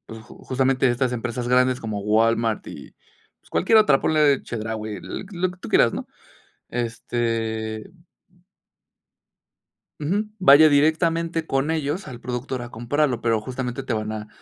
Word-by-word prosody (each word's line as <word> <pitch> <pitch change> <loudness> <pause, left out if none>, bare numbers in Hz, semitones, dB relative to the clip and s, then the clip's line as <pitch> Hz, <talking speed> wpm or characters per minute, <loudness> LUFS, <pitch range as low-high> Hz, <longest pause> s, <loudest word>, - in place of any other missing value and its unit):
pues, 110 0 -9
ju - - -15
justamente 130 0 +2
estas 125 +1 0
empresas 120 +1 -3
grandes 125 0 +3
como 110 -2 -4
Walmart, 115 +2 +1
y, - - -10 0.5
pues, - - -26
cualquier 220 +4 +4
otra, 150 -11 +4
ponle 150 -3 +3
Chedraui, 110 -1 -5
l - - -7
lo 180 0 -1
que 180 - -13
tú - - -9
quieras, 115 - +4
¿no? - - -5 0.6
Este 115 -1 -3 2.1
Ujú, 195 +9 0
vaya 155 -3 +7
directamente 165 +3 +1
con 140 +1 0
ellos 160 +4 -2
al 120 -2 -9
productor 125 +1 -4
a 120 - -7
comprarlo, 125 +2 -1
pero, 115 -2 +1
justamente, 125 +2 -4
te 130 -2 -3
van 110 0 -3
a 105 0 -6
125 Hz, 145 wpm, -23 LUFS, 115-150 Hz, 2.1 s, vaya